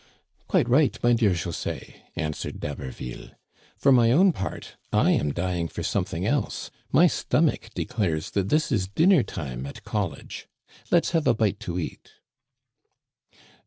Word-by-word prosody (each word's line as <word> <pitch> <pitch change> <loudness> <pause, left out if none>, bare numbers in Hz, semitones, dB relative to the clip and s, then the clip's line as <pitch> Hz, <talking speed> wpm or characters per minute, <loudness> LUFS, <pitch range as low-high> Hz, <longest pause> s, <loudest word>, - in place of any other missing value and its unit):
" - - -41
Quite - - +2
right, 135 +4 +3
my 120 0 +5
dear 115 -3 +3
José/* 85 -1 -4 0.2
answered 75 -3 -4
D*Haberville. 65 -3 -7 0.4
For 140 - +4
my 120 -3 +5
own 180 +7 +5
part, 95 - -6 0.2
I - - +4
am 75 - +1
dying 85 +1 -1
for - - -6
something 95 -2 -1
else. 125 +1 -1 0.2
My - - +6
stomach - - +1
declares 85 -8 -2
that 100 -1 -1
this 155 +2 +2
is 95 -7 +1
dinner 160 - +4
hour 65 -3 -4
at - - -10
college. 95 -9 -4 0.4
Let's 170 - +3
have 165 -4 +1
a 120 - +4
bite 110 -3 0
to 85 0 -4
eat." 85 - -6
100 Hz, 150 wpm, -25 LUFS, 85-125 Hz, 0.4 s, My